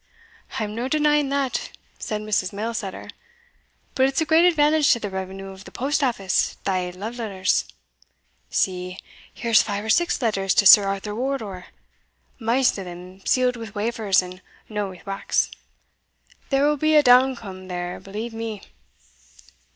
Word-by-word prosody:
"I'm 210 Hz, -1 st, -3 dB
no 235 Hz, +3 st, -3 dB
denying 295 Hz, 0 st, +2 dB
that," 275 Hz, -2 st, -1 dB, 0.3 s
said 215 Hz, -1 st, -3 dB
Mrs. 210 Hz, -3 st, -1 dB
Mailsetter; 210 Hz, -1 st, -5 dB, 0.9 s
"but 265 Hz, -1 st, +3 dB
it's 270 Hz, +3 st, -1 dB
a 320 Hz, -, +1 dB
great 320 Hz, +2 st, +5 dB
advantage 305 Hz, -3 st, +4 dB
to 235 Hz, -, -2 dB
the 205 Hz, -3 st, -5 dB
revenue 190 Hz, +1 st, -6 dB
of 190 Hz, 0 st, -12 dB
the -, -, -11 dB
post 285 Hz, +4 st, -1 dB
office 200 Hz, -8 st, 0 dB
thae 185 Hz, -2 st, -1 dB
love 215 Hz, +7 st, -7 dB
letters. 195 Hz, -4 st, 0 dB, 0.8 s
See, 180 Hz, 0 st, -1 dB, 0.3 s
here's 230 Hz, -1 st, +3 dB
five 205 Hz, 0 st, -3 dB
or 220 Hz, -, +1 dB
six 345 Hz, +6 st, +2 dB
letters 195 Hz, -6 st, 0 dB
to 205 Hz, -, +4 dB
Sir 205 Hz, 0 st, +9 dB
Arthur 195 Hz, +1 st, -3 dB
Wardour 220 Hz, -7 st, -4 dB, 0.7 s
maist 235 Hz, 0 st, +2 dB
o' -, -, -5 dB
them 180 Hz, +2 st, -11 dB
sealed 250 Hz, -1 st, +2 dB
wi' 225 Hz, -1 st, -7 dB
wafers, 210 Hz, -3 st, +1 dB
and 180 Hz, +1 st, -10 dB, 0.3 s
no 210 Hz, -2 st, -3 dB
wi' 185 Hz, -1 st, -12 dB
wax. 195 Hz, -1 st, -1 dB, 1.0 s
There 275 Hz, 0 st, +3 dB
will 300 Hz, 0 st, +2 dB
be 310 Hz, +2 st, +2 dB
a 300 Hz, -, +7 dB
downcome, 245 Hz, -7 st, +3 dB
there, 180 Hz, -1 st, -4 dB
believe 210 Hz, +5 st, -6 dB
me." 225 Hz, -3 st, -5 dB
215 Hz, 150 wpm, -23 LUFS, 195-260 Hz, 1.0 s, Sir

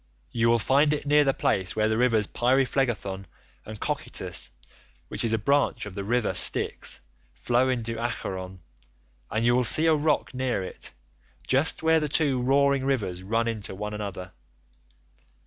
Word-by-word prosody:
You 115 Hz, 0 st, +2 dB
will 120 Hz, -, +4 dB
find 140 Hz, +6 st, +3 dB
it 145 Hz, -, -3 dB
near 150 Hz, +1 st, +5 dB
the 135 Hz, -, +3 dB
place 90 Hz, -2 st, 0 dB
where 110 Hz, 0 st, +2 dB
the 110 Hz, -, +1 dB
rivers 115 Hz, -3 st, +2 dB
Pyriphlegethon 120 Hz, -6 st, 0 dB, 0.4 s
and 110 Hz, -1 st, -8 dB
Cocytus -, -, -2 dB, 0.6 s
(which -, -, -3 dB
is 115 Hz, -, +1 dB
a 110 Hz, -, +2 dB
branch 125 Hz, 0 st, +1 dB
of 105 Hz, -, -8 dB
the 100 Hz, -, -5 dB
river 120 Hz, +3 st, 0 dB
Styx) -, -, 0 dB, 0.3 s
flow 125 Hz, +2 st, +1 dB
into 115 Hz, -2 st, -2 dB
Acheron, 95 Hz, -6 st, -4 dB, 0.7 s
and 110 Hz, +2 st, -1 dB
you 120 Hz, -, +4 dB
will 125 Hz, +1 st, +3 dB
see 155 Hz, +8 st, +5 dB
a 160 Hz, -, +5 dB
rock 150 Hz, -2 st, 0 dB
near 125 Hz, -6 st, -1 dB
it, 95 Hz, -, -7 dB, 0.5 s
just 140 Hz, +5 st, +1 dB
where 160 Hz, 0 st, +4 dB
the 150 Hz, -1 st, -2 dB
two 140 Hz, -4 st, +1 dB
roaring 140 Hz, +1 st, +2 dB
rivers 105 Hz, -10 st, -1 dB
run 115 Hz, +5 st, 0 dB
into 105 Hz, -4 st, -4 dB
one 105 Hz, +2 st, -5 dB
another. 100 Hz, -3 st, -6 dB
120 Hz, 165 wpm, -26 LUFS, 105-135 Hz, 0.7 s, near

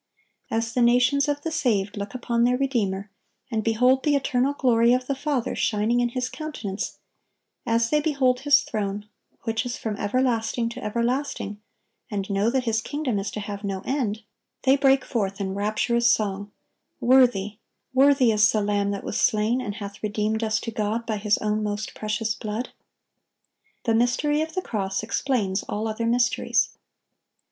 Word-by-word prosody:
As 225 Hz, +1 st, -1 dB
the 250 Hz, -, +1 dB
nations 250 Hz, +4 st, +4 dB
of 290 Hz, 0 st, -1 dB
the 325 Hz, -, -2 dB
saved 210 Hz, -9 st, 0 dB
look 200 Hz, +3 st, -5 dB
upon 235 Hz, -1 st, 0 dB
their 250 Hz, +1 st, +3 dB
Redeemer, 210 Hz, -7 st, -1 dB, 0.4 s
and 220 Hz, -1 st, -1 dB
behold 250 Hz, +4 st, +3 dB
the 295 Hz, 0 st, +2 dB
eternal 270 Hz, 0 st, +1 dB
glory 235 Hz, -3 st, +4 dB
of 255 Hz, 0 st, 0 dB
the 275 Hz, -, -1 dB
Father 275 Hz, -3 st, -2 dB
shining 220 Hz, +3 st, +1 dB
in 240 Hz, 0 st, +2 dB
His 250 Hz, +1 st, -2 dB
countenance; 255 Hz, -10 st, -5 dB, 0.7 s
as 230 Hz, 0 st, +2 dB
they 300 Hz, 0 st, +3 dB
behold 270 Hz, -5 st, +2 dB
His 285 Hz, +2 st, +4 dB
throne, 205 Hz, -1 st, -3 dB, 0.4 s
which 225 Hz, 0 st, -1 dB
is 245 Hz, -1 st, -4 dB
from 220 Hz, -2 st, -3 dB
everlasting 230 Hz, +1 st, 0 dB
to 235 Hz, -, -8 dB
everlasting, 235 Hz, -2 st, -2 dB, 0.5 s
and 200 Hz, -2 st, -3 dB
know 200 Hz, +3 st, +2 dB
that 260 Hz, +1 st, 0 dB
His 225 Hz, -2 st, 0 dB
kingdom 285 Hz, -8 st, -2 dB
is 195 Hz, +1 st, -3 dB
to -, -, -5 dB
have 205 Hz, 0 st, -6 dB
no 195 Hz, -2 st, -3 dB
end, 230 Hz, -6 st, -1 dB, 0.4 s
they 265 Hz, 0 st, +5 dB
break 270 Hz, -1 st, +3 dB
forth 200 Hz, -4 st, -2 dB
in 190 Hz, -1 st, -2 dB
rapturous 215 Hz, +4 st, +2 dB
song, 205 Hz, -2 st, -1 dB, 0.5 s
"Worthy, 240 Hz, -5 st, +3 dB, 0.4 s
worthy 270 Hz, -2 st, +5 dB
is 215 Hz, -1 st, +4 dB
the 215 Hz, -, +1 dB
Lamb 205 Hz, -1 st, 0 dB
that 200 Hz, -1 st, -3 dB
was -, -, -2 dB
slain, 220 Hz, +4 st, +2 dB
and 205 Hz, -5 st, -4 dB
hath 200 Hz, -2 st, -8 dB
redeemed 215 Hz, +1 st, -1 dB
us 220 Hz, 0 st, +1 dB
to 230 Hz, -, -4 dB
God 220 Hz, +1 st, -2 dB
by 220 Hz, -2 st, -2 dB
His 210 Hz, 0 st, +2 dB
own 215 Hz, 0 st, -1 dB
most 210 Hz, 0 st, -3 dB
precious 215 Hz, +1 st, -2 dB
blood!" 220 Hz, +3 st, -4 dB, 1.1 s
The 230 Hz, -, +1 dB
mystery 245 Hz, +6 st, +2 dB
of 320 Hz, +2 st, -4 dB
the 370 Hz, -, -1 dB
cross 195 Hz, -2 st, -2 dB
explains 220 Hz, -5 st, 0 dB
all 215 Hz, +2 st, -3 dB
other 220 Hz, +1 st, -2 dB
mysteries. 240 Hz, +1 st, +2 dB
230 Hz, 170 wpm, -25 LUFS, 210-255 Hz, 1.1 s, they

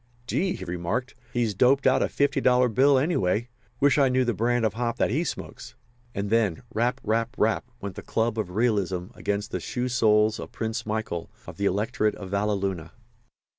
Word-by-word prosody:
"Gee!" 180 Hz, +8 st, 0 dB
he -, -, -7 dB
remarked. 90 Hz, +9 st, -3 dB, 0.2 s
"He's 120 Hz, -3 st, 0 dB
doped 130 Hz, +7 st, +3 dB
out -, -, +4 dB
a -, -, +1 dB
fifty 140 Hz, -1 st, +1 dB
dollar 125 Hz, -1 st, +4 dB
bill, 135 Hz, +5 st, +4 dB
anyway. 120 Hz, -, +1 dB, 0.3 s
Wish 145 Hz, -1 st, +4 dB
I 135 Hz, -2 st, +5 dB
knew 130 Hz, 0 st, +2 dB
the 120 Hz, -, +1 dB
brand 115 Hz, +3 st, +1 dB
of 110 Hz, -, 0 dB
hop 120 Hz, +1 st, -2 dB
that -, -, +1 dB
he 150 Hz, +8 st, +1 dB
smokes." -, -, -6 dB, 0.4 s
And 100 Hz, +1 st, -3 dB
then 110 Hz, -3 st, +1 dB
"Rap, 125 Hz, +3 st, 0 dB
rap, 115 Hz, +2 st, 0 dB
rap!" 110 Hz, +3 st, +1 dB
went 100 Hz, -2 st, -5 dB
the -, -, -8 dB
club 115 Hz, 0 st, -1 dB
of 105 Hz, -4 st, -2 dB
realism 100 Hz, -6 st, 0 dB
against 105 Hz, +2 st, -3 dB
the -, -, -2 dB
shoe 125 Hz, 0 st, -3 dB
soles 110 Hz, -3 st, +3 dB
of -, -, -7 dB
Prince 110 Hz, 0 st, -4 dB
Michael, 105 Hz, -6 st, -3 dB, 0.2 s
of -, -, -10 dB
the 100 Hz, -, -1 dB
Electorate 105 Hz, +2 st, 0 dB
of 95 Hz, -2 st, -9 dB
Valleluna. 100 Hz, -4 st, -1 dB
110 Hz, 190 wpm, -26 LUFS, 100-125 Hz, 0.4 s, I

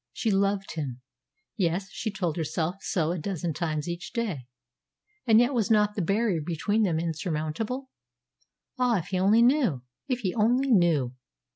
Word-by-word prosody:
She 225 Hz, -, 0 dB
loved 195 Hz, 0 st, +1 dB
him. 140 Hz, -6 st, -4 dB, 0.6 s
Yes, 185 Hz, +1 st, 0 dB
she 225 Hz, -, -3 dB
told 185 Hz, -6 st, -2 dB
herself 165 Hz, +2 st, -2 dB
so 165 Hz, -3 st, 0 dB
a 175 Hz, -, -2 dB
dozen 170 Hz, -1 st, -3 dB
times 155 Hz, -1 st, -2 dB
each 175 Hz, +1 st, -5 dB
day. 200 Hz, -, -3 dB, 0.8 s
And 225 Hz, -1 st, +7 dB
yet 245 Hz, +3 st, +3 dB
was 230 Hz, -3 st, +1 dB
not 210 Hz, -1 st, +3 dB
the 210 Hz, -, -2 dB
barrier 195 Hz, -1 st, +1 dB
between 175 Hz, +7 st, 0 dB
them 175 Hz, -7 st, +1 dB
insurmountable? 170 Hz, -, -3 dB, 0.9 s
Ah, 245 Hz, -3 st, +3 dB
if 175 Hz, -1 st, -5 dB
he 185 Hz, -, 0 dB
only 210 Hz, +5 st, +5 dB
knew! 240 Hz, -, +2 dB, 0.2 s
If 250 Hz, -2 st, -1 dB
he 185 Hz, -5 st, -1 dB
only 245 Hz, +5 st, +2 dB
knew! 165 Hz, -, +3 dB
190 Hz, 160 wpm, -27 LUFS, 160-225 Hz, 0.9 s, And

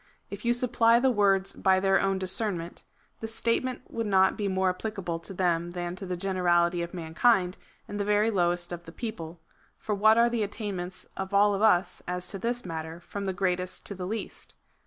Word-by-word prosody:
If 200 Hz, +1 st, -7 dB
you 240 Hz, 0 st, +3 dB
supply 235 Hz, -1 st, +3 dB
the 260 Hz, +1 st, +3 dB
words 195 Hz, -3 st, +2 dB
hy 190 Hz, 0 st, +5 dB
their 195 Hz, 0 st, +3 dB
own 195 Hz, 0 st, +1 dB
discernment, 185 Hz, -2 st, -1 dB, 0.4 s
the 225 Hz, -, -4 dB
statement 230 Hz, +3 st, -1 dB
would 230 Hz, -1 st, -3 dB
not 190 Hz, -1 st, +4 dB
be 205 Hz, -, -2 dB
more 190 Hz, -1 st, +1 dB
applicable 185 Hz, -4 st, -4 dB
to 165 Hz, -, -10 dB
them 175 Hz, -2 st, 0 dB
than 175 Hz, 0 st, -4 dB
to 195 Hz, -, -7 dB
the 180 Hz, 0 st, -3 dB
generality 175 Hz, -2 st, +2 dB
of 170 Hz, 0 st, -4 dB
man 165 Hz, -3 st, -7 dB
kind, 190 Hz, -3 st, +3 dB, 0.3 s
and 205 Hz, -, -5 dB
the -, -, +1 dB
very 210 Hz, +2 st, +2 dB
lowest 175 Hz, -2 st, 0 dB
of 175 Hz, 0 st, -6 dB
the 165 Hz, -, -10 dB
people; 175 Hz, -6 st, -6 dB, 0.4 s
for 215 Hz, -, -3 dB
what 215 Hz, +2 st, +5 dB
are 235 Hz, 0 st, +6 dB
the 235 Hz, -1 st, -1 dB
attainments 195 Hz, -3 st, -4 dB
of 190 Hz, +1 st, -4 dB
all 205 Hz, +1 st, +5 dB
of 200 Hz, -, -2 dB
us 190 Hz, -4 st, +3 dB
as 180 Hz, 0 st, -3 dB
to 195 Hz, -, -5 dB
this 240 Hz, +3 st, -2 dB
matter, 160 Hz, -1 st, -5 dB
from 200 Hz, +3 st, -6 dB
the 190 Hz, -, 0 dB
greatest 180 Hz, -1 st, -2 dB
to -, -, -4 dB
the 180 Hz, -2 st, -5 dB
least 220 Hz, +2 st, -6 dB
190 Hz, 205 wpm, -28 LUFS, 175-215 Hz, 0.4 s, are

